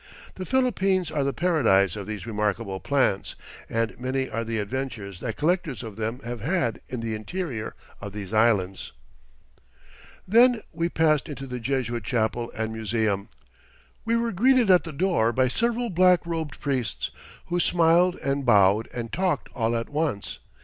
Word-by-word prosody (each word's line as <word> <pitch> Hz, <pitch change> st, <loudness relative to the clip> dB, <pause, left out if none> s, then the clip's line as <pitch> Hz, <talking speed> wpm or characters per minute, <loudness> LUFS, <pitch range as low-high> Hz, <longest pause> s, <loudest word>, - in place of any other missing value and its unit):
The 185 Hz, -, -7 dB
Philippines 195 Hz, -, +1 dB
are 150 Hz, -3 st, 0 dB
the 140 Hz, -, +1 dB
paradise 115 Hz, -, +2 dB
of 105 Hz, -1 st, -6 dB
these 105 Hz, -1 st, -5 dB
remarkable 105 Hz, -2 st, -2 dB
plants, 130 Hz, -8 st, 0 dB, 0.3 s
and 115 Hz, 0 st, -1 dB
many 130 Hz, +1 st, -1 dB
are 115 Hz, +1 st, -3 dB
the 115 Hz, 0 st, -3 dB
adventures 105 Hz, -4 st, -4 dB
that 115 Hz, +1 st, -4 dB
collectors 160 Hz, -5 st, 0 dB
of 110 Hz, -3 st, -8 dB
them 115 Hz, +4 st, -3 dB
have 120 Hz, -1 st, -6 dB
had 135 Hz, -, -1 dB
in 125 Hz, -2 st, -4 dB
the 115 Hz, -1 st, -3 dB
interior 120 Hz, -, -4 dB, 0.3 s
of 100 Hz, 0 st, -6 dB
these 105 Hz, 0 st, -7 dB
Islands. 105 Hz, -4 st, +1 dB, 1.3 s
Then 235 Hz, +3 st, +5 dB
we 170 Hz, +1 st, -1 dB
passed 155 Hz, -3 st, +2 dB
into 135 Hz, -2 st, -6 dB
the 125 Hz, -1 st, -5 dB
Jesuit 120 Hz, -2 st, -2 dB
chapel 115 Hz, +2 st, -1 dB
and 110 Hz, 0 st, -2 dB
museum. 110 Hz, -2 st, -1 dB, 0.7 s
We 230 Hz, +1 st, +1 dB
were 230 Hz, -1 st, 0 dB
greeted 240 Hz, +2 st, +4 dB
at 180 Hz, -1 st, +5 dB
the 165 Hz, -, -5 dB
door 160 Hz, -7 st, +1 dB
by 130 Hz, +2 st, +2 dB
several 235 Hz, -, 0 dB
black 180 Hz, 0 st, +4 dB
robed 160 Hz, -3 st, -4 dB
priests, 130 Hz, -6 st, -2 dB, 0.3 s
who 175 Hz, 0 st, -1 dB
smiled 175 Hz, +1 st, +4 dB
and 140 Hz, 0 st, 0 dB
bowed 105 Hz, -2 st, +4 dB
and 115 Hz, -2 st, -6 dB
talked 185 Hz, +1 st, 0 dB
all 115 Hz, 0 st, 0 dB
at 115 Hz, 0 st, -2 dB
once. 145 Hz, -9 st, -2 dB
130 Hz, 160 wpm, -25 LUFS, 110-175 Hz, 1.3 s, Then